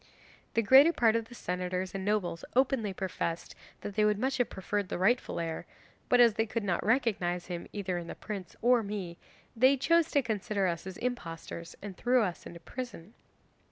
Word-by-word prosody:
The 230 - +3
greater 270 +9 +8
part 230 -8 +3
of 230 -1 0
the 240 - -13
senators 180 -1 -3
and 195 -1 -4
nobles 195 -5 -1
openly 260 -5 +2
professed 180 -3 -3 0.3
that 205 - -5
they 215 - +3
would 210 -1 +3
much 265 +5 0
have 245 - +2
preferred 200 0 -3
the - - -2
rightful 195 +4 +1
heir, 165 -1 -4 0.4
but 250 - +5
as 235 -2 +7
they 225 +2 0
could 225 0 -2
not 180 -4 0
recognise 200 -7 +1
him 175 -1 -6
either 185 -3 -2
in 170 - -8
the - - -6
prince 200 -4 -7
or 245 0 +5
me, 200 -5 -5 0.4
they 260 +4 +5
chose 335 +4 +3
to 285 -2 +2
consider 210 -3 -1
us 170 0 -2
as 185 -2 -7
impostors 170 -8 -5
and 200 -2 -6
threw 245 0 +3
us 180 -4 -4
into 170 - -10
prison. 225 -2 -8
205 Hz, 190 wpm, -30 LUFS, 180-240 Hz, 0.4 s, greater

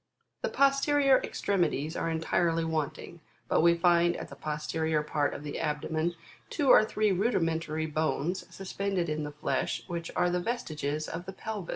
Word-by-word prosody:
The - - -1
posterior 275 0 +4
extremities 165 -5 -1
are 165 - -1
entirely 165 0 +1
wanting: 160 +1 -3 0.3
but - - +3
we 170 +1 +5
find 175 0 +3
at - - -7
the - - -10
posterior 155 0 -1
part 150 -1 0
of - - -7
the 145 - -5
abdomen, 155 +3 -1 0.3
two 290 -4 0
or - - +8
three 215 -1 +1
rudimentary 165 -6 0
bones, 155 +3 -1
suspended 195 -2 -2
in 155 0 -2
the 150 - -5
flesh, 145 - -2
which 170 -2 -5
are 180 0 +2
the 180 - +1
vestiges 155 -8 -3
of 175 +3 -6
the 190 - -5
pelvis. 205 -2 -6
170 Hz, 165 wpm, -29 LUFS, 155-190 Hz, 0.3 s, or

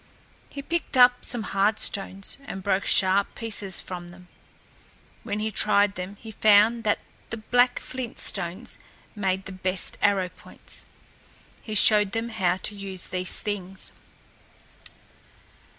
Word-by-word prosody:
He 280 - -7
picked 330 -3 -1
up 245 0 +6
some 240 -3 +2
hard 200 +2 +1
stones, 195 -1 -1
and 195 -7 -7
broke 195 0 0
sharp 195 +1 +3
pieces 205 -4 -3
from 175 -1 -7
them. 180 0 -15 0.9
When 205 - -4
he 215 +1 -2
tried 205 -1 +3
them 190 +1 -7
he 225 - -10
found 215 +2 +4
that 210 - +3 0.3
the 225 - -4
black 245 +3 +2
flint 255 -2 -6
stones 175 +7 -2 0.4
made 190 -2 -1
the - - -7
best 185 0 -1
arrow 195 -3 +2
points. 180 - -11 0.7
He 215 - -6
showed 210 -1 +5
them 225 +1 -2
how 185 -5 0
to 205 +2 -2
use 195 -2 -3
these 185 -1 -2
things. 195 -2 -5
205 Hz, 135 wpm, -25 LUFS, 190-220 Hz, 0.9 s, up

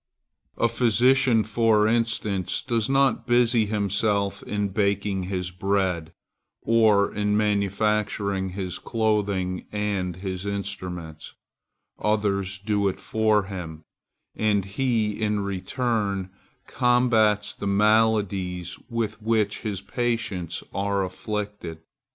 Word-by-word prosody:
A - - +3
physician, 120 0 +3
for 110 0 +3
instance, 110 -4 0
does 115 -1 0
not 135 -3 +2
busy 120 -2 +3
himself 100 -1 0
in 105 -1 -2
baking 100 -1 0
his 90 -1 -3
bread, 90 -3 -1 0.5
or 110 -3 +4
in 105 0 +1
manufacturing 100 -1 0
his 95 -2 -3
clothing 100 -5 -1
and 100 -4 -2
his 95 0 -5
instruments; 90 -5 -5 0.6
others 100 -3 0
do 100 0 0
it 95 - -2
for 110 +1 +2
him, 85 -5 -7 0.5
and 105 -3 +1
he, 110 0 -1
in 105 -1 +1
return, 100 -1 -2 0.3
combats 120 -4 +2
the 100 - -5
maladies 100 -4 +1
with 115 -2 -3
which 110 -2 +1
his 100 -4 -3
patients 105 -8 -2
are 100 0 0
afflicted. 100 -4 -5
105 Hz, 105 wpm, -25 LUFS, 95-110 Hz, 0.6 s, or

